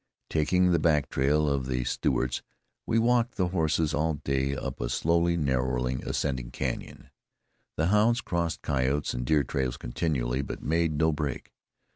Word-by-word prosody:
Taking 90 +4 +3
the 85 - +3
back 75 -4 +2
trail 75 +3 +2
of 70 -2 0
the 65 -1 -1
Stewarts, 60 +1 0 0.5
we 115 - +2
walked 120 +1 +2
the 90 -2 0
horses 80 -3 +1
all 80 +1 +1
day 70 -1 -1
up - - -5
a - - -2
slowly 85 +6 +2
narrowing, 65 -3 0
ascending 65 -4 -2
canyon. - - -5 0.6
The 80 - +1
hounds 110 +4 +4
crossed 85 -7 -2
coyote 70 +1 0
and 60 0 -4
deer 75 -2 +3
trails 65 -3 -2
continually, 65 -1 -1
but 70 - -6
made 80 +2 +1
no 80 +2 +2
break. 75 -2 -4
75 Hz, 155 wpm, -28 LUFS, 65-85 Hz, 0.6 s, hounds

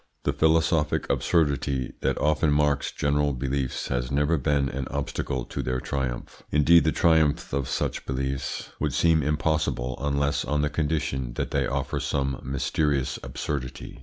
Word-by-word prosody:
The - - +1
philosophic 80 -1 +2
absurdity 70 -5 +1
that 65 -1 0
often 75 0 +2
marks 75 -1 +2
general 75 0 +1
beliefs 65 0 -2
has 60 0 -1
never 75 +4 +2
been 70 0 +1
an 65 0 -4
obstacle 65 -2 -3
to - - -4
their 65 0 -1
triumph. 65 -2 -4
Indeed 80 +3 +5
the 80 - +3
triumph 80 -6 +2
of 70 -2 -1
such - - -2
beliefs 65 +1 -3
would - - -1
seem 80 -2 +4
impossible 75 -4 0
unless 70 0 0
on 75 0 0
the 75 - 0
condition 75 -5 -1
that - - -3
they 70 -2 +1
offer 70 0 -2
some 70 -2 -1
mysterious 70 +1 0
absurdity. 65 -4 -5
70 Hz, 150 wpm, -26 LUFS, 65-75 Hz, -, Indeed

